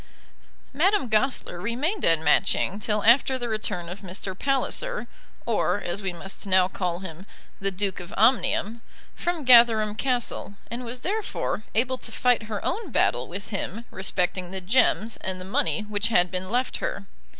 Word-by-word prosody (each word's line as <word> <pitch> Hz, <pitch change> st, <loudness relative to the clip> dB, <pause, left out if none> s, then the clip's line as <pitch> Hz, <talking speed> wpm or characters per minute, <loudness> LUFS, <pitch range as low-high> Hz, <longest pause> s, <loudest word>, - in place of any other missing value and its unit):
Madame 370 Hz, +2 st, +2 dB
Goesler 215 Hz, -5 st, 0 dB
remained 270 Hz, -, -1 dB
at 165 Hz, -, +5 dB
Matching 185 Hz, +5 st, +2 dB
till 210 Hz, -1 st, -1 dB
after 260 Hz, +3 st, +5 dB
the 245 Hz, -1 st, -4 dB
return 205 Hz, -5 st, -2 dB
of 180 Hz, +3 st, -7 dB
Mr. 190 Hz, 0 st, -6 dB
Palliser 285 Hz, -, -1 dB, 0.4 s
or, 205 Hz, -4 st, +1 dB
as 175 Hz, +4 st, -4 dB
we 190 Hz, -2 st, -2 dB
must 195 Hz, +4 st, -7 dB
now 185 Hz, -1 st, +5 dB
call 180 Hz, -2 st, -3 dB
him, 185 Hz, +1 st, -9 dB, 0.3 s
the 195 Hz, -, 0 dB
Duke 195 Hz, 0 st, -2 dB
of 180 Hz, +1 st, -9 dB
Omnium 230 Hz, -1 st, +2 dB, 0.3 s
from 345 Hz, -4 st, -3 dB
Gatherum 230 Hz, -4 st, +6 dB
Castle, 240 Hz, -3 st, -2 dB, 0.2 s
and 240 Hz, +2 st, -4 dB
was 245 Hz, +1 st, -6 dB
therefore 400 Hz, -, -2 dB
able 255 Hz, +3 st, +1 dB
to 230 Hz, -, -4 dB
fight 235 Hz, -2 st, +1 dB
her 210 Hz, -2 st, -4 dB
own 415 Hz, -1 st, -2 dB
battle 125 Hz, -, +1 dB
with 200 Hz, +3 st, -7 dB
him 220 Hz, +2 st, -4 dB
respecting 185 Hz, -1 st, -1 dB
the 190 Hz, +1 st, -4 dB
gems 220 Hz, +2 st, +2 dB
and 185 Hz, -1 st, -4 dB
the 185 Hz, -, -6 dB
money 200 Hz, +3 st, 0 dB
which 210 Hz, 0 st, -2 dB
had 180 Hz, -6 st, +3 dB
been 185 Hz, 0 st, -3 dB
left 250 Hz, +4 st, 0 dB
her. -, -, -4 dB
215 Hz, 165 wpm, -25 LUFS, 185-250 Hz, 0.4 s, Gatherum